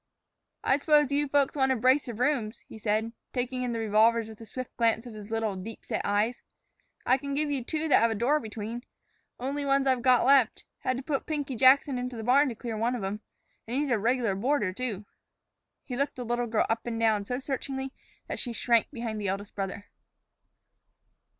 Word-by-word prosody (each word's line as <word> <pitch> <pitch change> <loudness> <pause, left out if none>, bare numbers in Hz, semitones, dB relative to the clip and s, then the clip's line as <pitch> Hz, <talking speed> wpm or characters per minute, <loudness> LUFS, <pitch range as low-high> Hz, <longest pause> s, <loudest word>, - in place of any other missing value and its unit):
"I 265 - +3
suppose 295 -2 +4
you 290 +1 +1
folks 280 0 +2
want 265 -2 +2
a - - +3
brace 255 +4 +3
of 235 -3 -5
rooms," 245 -4 0
he 220 - -11
said, 220 +2 0 0.2
taking 255 0 -2
in 250 -1 -1
the 230 - -2
revolvers 225 +1 +3
with 220 0 -12
a 225 - -10
swift 255 +1 -7
glance 230 0 +2
of 240 - -8
his 210 -1 -9
little, 225 -2 -1
deep 205 +4 -8
set - - -2
eyes. 210 +4 0 0.6
"I 260 +2 +4
can 280 +1 -4
give 295 0 0
you 270 -3 -1
two 315 +5 -2
that 290 - +5
have 230 - +4
a 225 - -1
door 260 +8 +2
between. 225 0 -6 0.6
Only 275 +3 -2
ones 275 0 +2
I've 260 -2 +2
got 250 -1 +4
left. 265 -4 +4
Had 255 - -1
to 265 - -5
put 280 -1 -2
Pinky 290 -4 -2
Jackson 260 +2 +5
into 250 0 -4
the 220 - -5
barn 270 +5 +4
to 235 - -5
clear 230 0 -5
one 235 +3 0
of 230 - -4
'em. 195 +2 -3 0.5
And 240 +3 -2
he's 290 0 0
a 235 -4 +2
reg'lar 235 -1 +1
boarder, 210 -1 0
too." 215 -3 -4 0.8
He 250 - -5
looked 280 +3 -1
the 250 - -5
little 240 +1 -1
girl 220 -1 +2
up 225 +1 -2
and 230 -1 -2
down 220 -3 +2
so 250 +4 -2
searchingly 265 0 -4 0.3
that - - -5
she 240 - -3
shrank 230 0 +2
behind 230 -5 -4
the 200 - -2
eldest 200 +2 -3
brother. 195 0 -4
245 Hz, 215 wpm, -28 LUFS, 220-270 Hz, 0.8 s, that